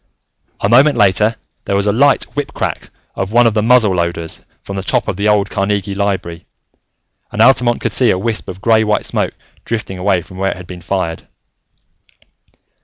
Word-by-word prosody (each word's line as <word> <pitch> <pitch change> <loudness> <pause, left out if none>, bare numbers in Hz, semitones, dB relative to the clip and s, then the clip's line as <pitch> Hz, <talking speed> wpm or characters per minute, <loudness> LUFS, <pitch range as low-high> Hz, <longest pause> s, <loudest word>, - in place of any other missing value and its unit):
A - - +2
moment 130 +5 +5
later, 105 +2 +3 0.3
there 100 - -1
was 100 0 +1
a 105 - +2
light 140 +6 +3
whip 145 -1 -4
crack - - -3 0.2
of 95 +1 -4
one 120 +1 +4
of 115 - +3
the 105 - +1
muzzleloaders, 90 -8 +1 0.2
from 100 - -7
the 95 - -3
top 95 - -1
of - - -2
the 100 +3 -1
old 105 -1 +2
Carnegie 100 0 -1
Library, 95 -4 -3 0.8
and - - -6
Altamont 120 0 +4
could - - -1
see 125 -3 +3
a 95 - +2
wisp 110 +3 -3
of 95 +1 -8
grey 110 0 +3
white 105 -1 0
smoke - - -2 0.3
drifting 105 -5 -4
away 90 -2 +1
from 95 - -13
where 95 +1 0
it - - -4
had 90 - -10
been 90 0 -10
fired. 90 -2 -3
100 Hz, 185 wpm, -16 LUFS, 95-115 Hz, 0.8 s, moment